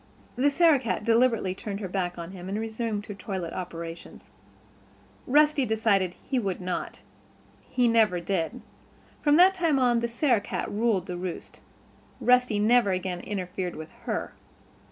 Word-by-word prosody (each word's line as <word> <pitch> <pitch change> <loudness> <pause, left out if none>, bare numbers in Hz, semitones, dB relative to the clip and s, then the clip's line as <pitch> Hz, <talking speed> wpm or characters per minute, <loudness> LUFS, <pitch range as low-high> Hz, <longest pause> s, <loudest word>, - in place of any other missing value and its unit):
The 265 +4 +3
Sarah 320 -1 +4
cat 235 -3 -2
deliberately 230 -4 +2
turned 200 +1 -6
her 200 - -4
back 180 -1 -2
on 170 +1 -7
him 185 -1 -8
and 200 - -2
resumed 220 -1 -3
her 205 - -6
toilet 190 -4 -5
operations. 170 -2 -8 1.0
Rusty 295 +1 +4
decided 215 -6 +1
that - - -26
he 265 -2 -1
would 195 -5 -2
not. 180 -1 -4 0.7
He 245 -1 +2
never 220 -6 +3
did. 170 -2 -2 0.6
From 295 -1 +4
that 365 +4 +7
time 335 -6 +1
on 245 -2 +3
the 235 - -1
Sarah 235 -1 +1
cat - - -4
ruled 210 -3 +1
the 180 -2 -5
roost. 180 -1 -6 0.6
Rusty 250 -3 +3
never 215 0 +4
again 185 -1 -2
interfered 185 -2 -4
with 160 0 -9 0.2
her. - - -2
210 Hz, 155 wpm, -27 LUFS, 185-245 Hz, 1.0 s, that